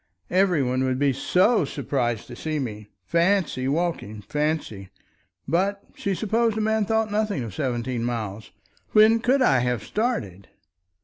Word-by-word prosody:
Every 180 -5 +3
one 130 +1 0
would 130 -1 0
be 140 0 +2
so 185 - +3
surprised 120 -5 -2
to - - -10
see 155 -1 -3
me. 105 -6 -5 0.2
Fancy 170 - +1
walking! 140 -9 -2
Fancy! 150 -7 -2 0.6
But 195 +4 0
she 195 -1 -2
supposed 220 +2 +1
a - - 0
man 220 0 +1
thought 220 0 0
nothing 210 - 0
of 110 -5 -7
seventeen 120 -1 -2
miles. 110 -3 -4 0.4
When 220 +1 +6
could 260 +3 +2
I 135 -2 +4
have 125 -3 -1
started! 105 - -2
150 Hz, 145 wpm, -24 LUFS, -, 0.6 s, When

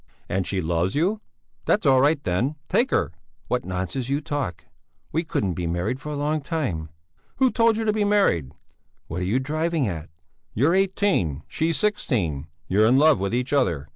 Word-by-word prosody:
"And 95 0 -1
she 95 -2 0
loves 85 +3 0
you? 195 +8 +1 0.4
That's 205 -4 +2
all 130 -2 +5
right, 145 +2 +3
then! 120 +11 0
Take 235 +8 +2
her!" 75 - +1 0.4
"What - - 0
nonsense 95 +8 -3
you 140 +1 +1
talk! 145 - -4 0.5
We 165 +3 0
couldn't 100 - -1
be 85 0 -3
married 90 +9 -1
for 150 - -7
a - - -3
long 150 +2 0
time!" 130 - -3 0.5
"Who 260 -1 +3
told 230 -1 +3
you 225 - -1
to 215 - +2
be 215 -1 +1
married?" 200 - +2 0.5
"What 90 +3 -4
are - - -1
you 105 +7 +1
driving 155 +1 0
at?" 85 -4 -5 0.5
"You're 145 +10 +3
eighteen, 190 - +1
she's 165 +1 -1
sixteen! 100 - -1 0.2
You're 105 +3 +4
in 125 +3 +5
love 150 +1 +5
with 100 0 -1
each 125 +4 -1
other! 85 - +1
135 Hz, 185 wpm, -24 LUFS, -, 0.5 s, all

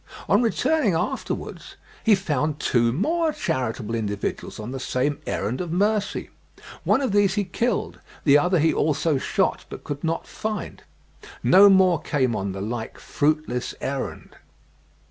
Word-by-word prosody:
On 205 - +4
returning 250 - +1
afterwards - - -4 0.3
he 220 -2 +5
found 150 -5 -1
two 120 -4 +2
more 315 - +1
charitable 115 - -3
individuals 105 -3 -3
on 110 +3 -6
the 135 - -5
same 130 +3 -1
errand 110 - -2
of 175 -3 -4
mercy. 205 +3 0 0.5
One 270 - +3
of 265 - 0
these 200 -1 +3
he 205 - +1
killed; 215 +4 -2 0.2
the 140 -2 +5
other 180 +5 +4
he 160 0 +3
also 150 -1 +1
shot, - - 0
but - - -9
could 145 0 -6
not 165 0 -1
find. 215 -1 -5 0.6
No 200 +2 +7
more 185 -4 +4
came 130 -5 0
on 95 -1 -2
the 95 0 -6
like 110 +2 -4
fruitless 150 -5 -1
errand.") 135 0 -5
155 Hz, 145 wpm, -24 LUFS, 125-200 Hz, 0.6 s, No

